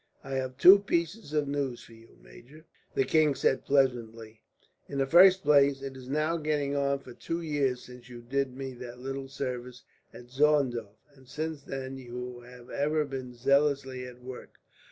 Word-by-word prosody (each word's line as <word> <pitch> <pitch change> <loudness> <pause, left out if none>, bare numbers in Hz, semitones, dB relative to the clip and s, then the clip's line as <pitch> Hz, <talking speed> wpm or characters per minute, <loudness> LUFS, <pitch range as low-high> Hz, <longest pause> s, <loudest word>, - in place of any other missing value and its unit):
"I 135 - -9
have 130 -1 -3
two 190 +7 +9
pieces 175 -1 -2
of 150 -2 0
news 140 -4 -3
for 115 - -16
you, 115 0 -18
major," 125 - -16 0.3
the 135 - +3
king 155 -2 +3
said 130 - +1
pleasantly. 115 -5 0 0.5
"In 140 - -5
the 135 - +2
first 185 +6 +7
place, 140 -2 +4
it 135 -1 -6
is 130 -1 -11
now 155 +4 0
getting 150 -2 -1
on 140 0 +1
for 125 -2 -12
two 165 +7 -4
years 140 -5 -1
since 125 0 -13
you 120 -1 -10
did 130 +1 -2
me 135 -1 -5
that 120 0 -9
little 135 +1 -5
service 125 -2 -5 0.3
at 120 0 -13
Zorndorf, 130 -7 +1 0.2
and 135 -2 -20
since 155 +2 -4
then 135 -1 -6
you 125 0 -7
have 125 0 -14
ever 150 +2 0
been 130 -3 -7
zealously 135 0 +1
at 125 0 -13
work. 130 0 -10
135 Hz, 175 wpm, -29 LUFS, 125-145 Hz, 0.5 s, two